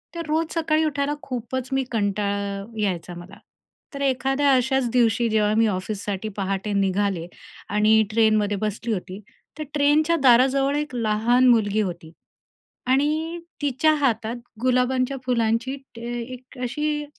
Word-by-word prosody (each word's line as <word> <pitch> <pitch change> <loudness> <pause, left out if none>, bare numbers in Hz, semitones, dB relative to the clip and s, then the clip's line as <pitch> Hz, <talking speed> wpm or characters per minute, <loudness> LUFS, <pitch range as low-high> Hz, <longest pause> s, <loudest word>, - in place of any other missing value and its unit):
तर 335 -1 -4
रोज 320 +1 -1
सकाळी 315 -1 +1
उठायला 285 -1 -1
खूपचं 260 +1 -4
मी 270 - +1
कंटाळा 200 -2 -1 0.2
यायचा 180 -3 -2
मला, 175 +3 -11 0.6
तर 280 - -6
एखाद्या 270 +1 +1
अशाच 260 -1 +1
दिवशी 235 -1 +2
जेव्हा 210 -1 +2
मी 225 0 +4
ऑफिससाठी 200 +1 -3
पहाटे 195 +1 -2
निघाले 195 -3 0 0.4
आणि 215 +1 +4
ट्रेनमध्ये 215 -2 +2
बसली 215 +2 -2
होती. 185 +1 -5 0.4
तर - - -2
ट्रेनच्या 300 +3 +3
दाराजवळ 270 +3 +4
एक 295 -4 -4
लहान 235 +3 +2
मुलगी 215 -2 +3
होती 170 -4 -5 0.8
आणि 310 +5 +1 0.2
तिच्या 290 +3 +2
हातात 235 -5 0 0.3
गुलाबांच्या 255 +1 +1
फुलांची 235 +1 0
एक 275 - -8
ट - - -9
एक 240 +2 -7
अ, - - -8
अशी 295 +3 -2
240 Hz, 135 wpm, -23 LUFS, 210-275 Hz, 0.8 s, मी